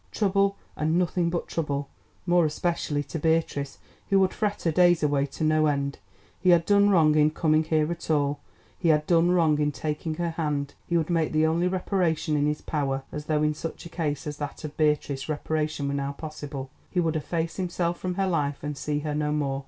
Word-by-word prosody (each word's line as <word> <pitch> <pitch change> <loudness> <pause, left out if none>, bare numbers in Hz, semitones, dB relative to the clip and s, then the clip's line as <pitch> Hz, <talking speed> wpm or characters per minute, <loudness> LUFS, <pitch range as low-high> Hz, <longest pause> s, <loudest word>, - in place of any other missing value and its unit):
Trouble, 200 -1 +1 0.2
and 155 +2 +1
nothing 175 -1 +1
but 170 0 -2
trouble, 145 -3 -2 0.4
more 175 -1 +4
especially 155 -2 -1
to 155 +3 -5
Beatrice, 160 -3 0 0.3
who 195 - +4
would 190 -1 +2
fret 210 -2 -2
her 165 - +2
days 175 0 +4
away 145 -1 +2
to 145 - -6
no 155 0 +3
end. 140 -1 -1 0.4
He 185 - +2
had 170 -2 +5
done 205 +1 +5
wrong 160 -6 +5
in 150 0 +4
coming 155 0 +2
here 155 0 +1
at 170 -1 -6
all, 145 -2 +1 0.4
he 170 - +1
had 150 -1 +3
done 170 +1 +4
wrong 165 -4 +3
in 150 0 +1
taking 150 +3 -3
her 170 0 -2
hand. 150 -3 -2
He 170 - +2
would 165 +1 -1
make 165 -2 +1
the 155 0 +3
only 165 +3 +2
reparation 180 -4 0
in 145 0 +2
his 150 0 -1
power 135 -3 -1
(as 150 0 -6
though 155 -1 +1
in 150 0 +2
such 160 +3 -6
a - - -8
case 155 -3 -3
as 150 -1 -5
that 145 +1 -6
of 155 -1 -6
Beatrice 150 -2 0
reparation 155 -1 -1
were 140 - -1
now 140 0 -2
possible)! 145 -3 -7 0.2
He 180 - -1
would 165 -2 +1
efface 165 +2 -2
himself 175 -2 -1
from 180 -1 -3
her 195 - +1
life 145 -6 -1
and 150 0 -3
see 150 +1 -2
her 150 0 -3
no 150 0 0
more. 140 -2 -1
155 Hz, 215 wpm, -26 LUFS, 150-170 Hz, 0.4 s, had